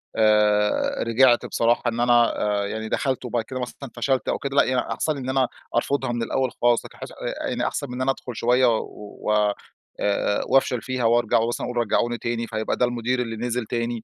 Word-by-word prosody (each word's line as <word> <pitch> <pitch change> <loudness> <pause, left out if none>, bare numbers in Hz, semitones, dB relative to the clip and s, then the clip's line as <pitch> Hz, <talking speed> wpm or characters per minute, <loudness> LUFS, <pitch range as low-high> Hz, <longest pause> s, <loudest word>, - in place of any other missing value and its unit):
آآ، 105 -1 +2
رجعت 120 +1 +4
بصراحة 115 +1 +1
إن 120 0 -1
أنا 120 -1 +3 0.2
آآ، - - -2
يعني 110 +1 -5
دخلت 130 +1 -1
وبعد 120 -1 -1
كده 130 +3 -6
مثلًا 130 +2 -7
فشلت 130 +2 0
أو - - 0
كده، 140 0 -4
لأ 140 - +6
يعني 130 0 +1
أحسن 155 - -1
لي 140 - -6
إن 130 -1 -5
أنا 130 -1 +2 0.3
أرفضها 130 +1 0
مِن 120 -1 -2
الأوّل 130 +2 -1
خلاص، 120 -1 +3
لكن - - -13
حاسس - - -8
آآ، - - -13 0.3
آآ - - -1
يعني - - -1
أحسن 145 - -3
مِن 125 - -8
إن 130 - -4
أنا 135 +1 +2
أدخل 125 -3 -7
شويّة 125 +3 +3
و 105 0 -6
آآ، 105 -1 +2 0.4
آآ 105 0 0
وأفشل 130 -3 +2
فيها 130 -2 -2
وأرجع 115 -1 +3
ومثلًا 115 +1 -2
أقول 125 - -5
رجعوني 120 +1 +1
تاني؛ 115 0 -3
فهيبقى 110 0 -2
ده 125 - +3
المدير 120 +1 -1
اللي 115 -2 -4
نزِل 120 0 -2
تاني، 115 0 -3
120 Hz, 220 wpm, -23 LUFS, 115-130 Hz, 0.4 s, لأ